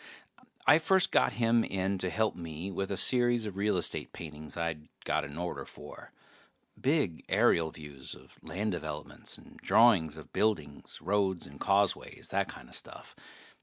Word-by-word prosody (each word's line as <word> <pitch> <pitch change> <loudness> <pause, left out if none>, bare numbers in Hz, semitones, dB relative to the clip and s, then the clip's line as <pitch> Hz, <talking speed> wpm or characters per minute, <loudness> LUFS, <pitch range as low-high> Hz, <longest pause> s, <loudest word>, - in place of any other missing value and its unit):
I 150 - +7
first 190 +3 +3
got - - +4
him 115 -1 +3
in 95 0 -1
to 90 - -1
help 110 +5 +1
me 85 +2 -6
with 95 +1 -2
a 100 - -2
series 120 -1 +3
of 105 -3 -5
real 100 0 +1
estate 85 - -1
paintings 75 -1 -7
I'd 80 -2 -3 0.2
got 80 0 +1
an 75 0 -7
order 90 0 -3
for. - - -11 0.7
Big 135 - +1
aerial 80 -1 +4
views 75 -4 -7
of - - -18
land 105 +3 -2
developments, 75 -4 -6
and - - -16
drawings 100 -9 +4
of 80 - -12
buildings, 80 -10 -1
roads 95 -1 +1
and 70 +1 -12
causeways, 100 -1 +1
that - - 0
kinda - - -12
stuff. - - -7
95 Hz, 160 wpm, -31 LUFS, 80-110 Hz, 0.7 s, I